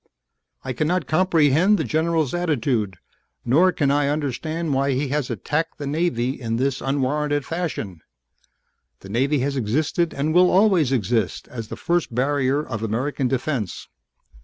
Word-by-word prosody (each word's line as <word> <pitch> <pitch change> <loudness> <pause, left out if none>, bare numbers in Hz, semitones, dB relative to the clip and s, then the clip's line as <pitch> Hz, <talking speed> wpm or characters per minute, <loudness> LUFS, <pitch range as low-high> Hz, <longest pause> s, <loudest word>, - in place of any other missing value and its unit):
"I 130 - -3
cannot 155 +6 0
comprehend 170 +2 +3
the - - -1
general's 160 -2 0
attitude, 125 - 0 0.5
nor 165 +10 +4
can 145 -5 +1
I 145 0 +2
understand 155 +2 -2
why 135 +1 +1
he 135 +2 -1
has 145 -2 -1
attacked 150 - -2
the 145 - -5
Navy 140 -4 -1
in 115 -1 -2
this 135 +2 -1
unwarranted 145 +1 0
fashion. 150 - -4 1.0
The 95 - -11
Navy 135 +7 +1
has 140 +1 -1
existed 145 +8 0
and 150 +3 0
will 180 +1 +6
always 185 - +4
exist 115 -4 0
as 115 -3 -6
the - - -6
first 170 -8 -1
barrier 140 +2 +1
of 110 -4 -4
American 125 +5 -1
defense. 125 - -3
140 Hz, 145 wpm, -22 LUFS, 125-160 Hz, 1.0 s, will